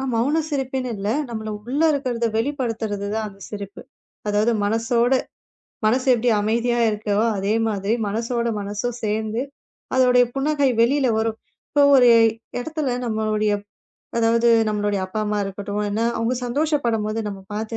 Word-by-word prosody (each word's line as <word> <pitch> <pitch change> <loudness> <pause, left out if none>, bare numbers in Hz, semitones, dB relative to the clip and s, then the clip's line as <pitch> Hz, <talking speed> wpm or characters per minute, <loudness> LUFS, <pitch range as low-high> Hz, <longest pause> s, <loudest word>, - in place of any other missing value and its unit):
மௌன 275 +8 +1
சிரிப்புன்னு 265 -3 -2
இல்ல. 200 +1 -3 0.2
நம்மள்ல 220 -2 -5 0.2
உள்ள 280 +5 -1
இருக்கிறத 250 -5 -1
வெளிப்படுத்துறது 225 -6 -2
தான் 220 0 -1
அந்தச் 195 -1 -11
சிரிப்பு. 200 -1 -7 0.5
அதாவது 210 +3 +2
மனசோட 230 +3 +1 0.7
மனசு 255 +4 +2
எப்டி 245 +1 +1
அமைதியா 235 +3 +1
இருக்கோ, 210 -1 -2 0.2
அதே 200 +2 0
மாதிரி 205 0 -1
மனசோட 235 +3 -1
மனசும் 210 +4 -3
சேர்ந்து 220 +2 -1 0.5
அதோட 255 -1 +4 0.2
புன்னகை 285 0 +1
வெளியில 265 +3 +3
வரும். 225 0 -1 0.3
இப்ப 290 - +3
ஒரு 245 -1 +6 0.5
எடத்துல 300 -2 -2
நம்மளுடைய 215 -1 0 0.7
அதாவது 230 +1 +3 0.2
நம்மளுடைய 205 -1 0
அப்பா, 200 +3 -5
அம்மா 210 0 -1
இருக்கட்டும். 200 +1 -5
என்ன 205 +2 -2 0.2
அவங்க 230 +2 0
சந்தோஷப்படும்போது 240 -6 0
நம்ம 195 -2 -5
பாத்து 220 +2 -3
225 Hz, 130 wpm, -22 LUFS, 210-250 Hz, 0.7 s, ஒரு